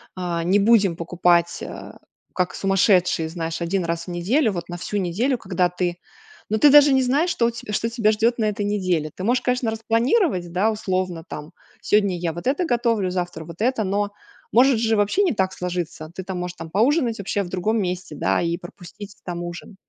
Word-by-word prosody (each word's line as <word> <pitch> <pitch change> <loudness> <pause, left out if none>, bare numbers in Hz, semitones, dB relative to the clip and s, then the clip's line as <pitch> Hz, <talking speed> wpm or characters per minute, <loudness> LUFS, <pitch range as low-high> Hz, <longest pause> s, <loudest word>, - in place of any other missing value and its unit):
А, 175 -2 -2
не 190 +4 +3
будем 205 -4 +4
покупать 170 0 +1
э, - - -8 0.4
как 180 -1 -1
сумасшедшие, 190 -4 +2
знаешь, 165 0 -4
один 175 +1 -1
раз 170 +1 -3
в - - -5
неделю, 220 - +1
вот 170 -1 -6
на 175 - -5
всю 205 +4 -4
неделю, 205 +8 0
когда 180 -3 0
ты, 175 0 -2 0.5
но 215 - +1
ты 290 +7 +6
даже 285 -1 +7
не 265 - +4
знаешь, 285 +8 +1
что 235 -8 +1
у - - 0
те 230 -1 -8
что 230 - 0
тебя 225 -2 +2
ждет 230 +3 +1
на 220 - +2
этой 210 -1 -1
неделе. 185 -7 -1
Ты 185 - -7
можешь, 245 +5 +2
конечно, 250 -2 0
распланировать, 225 - +1
да, 195 +6 +2
условно, 185 -5 -2
там 150 +2 -8 0.3
сегодня 200 -3 +2
я 170 -1 -2
вот 175 +8 -6
это 290 +7 +1
готовлю, 230 - +1
завтра 175 -3 -4
вот 170 +3 -10
это, 240 -1 +1
но 200 +1 -1 0.4
может 250 0 +5
же 225 -1 +2
вообще 205 - +2
не 370 - +2
так 190 -3 0
сложиться. 175 -4 -4
Ты 190 - -5
там, 185 -1 -5
можешь 180 0 -5
там 165 -1 -8
поужинать 235 - +2
вообще 200 0 -1
в 175 - -8
другом 210 +5 0
месте, 180 0 -4
да, - - +1
и 170 0 -1
пропустить 185 +3 -11
там 175 -1 -4
ужин. 175 +4 -8
195 Hz, 205 wpm, -22 LUFS, 175-230 Hz, 0.5 s, даже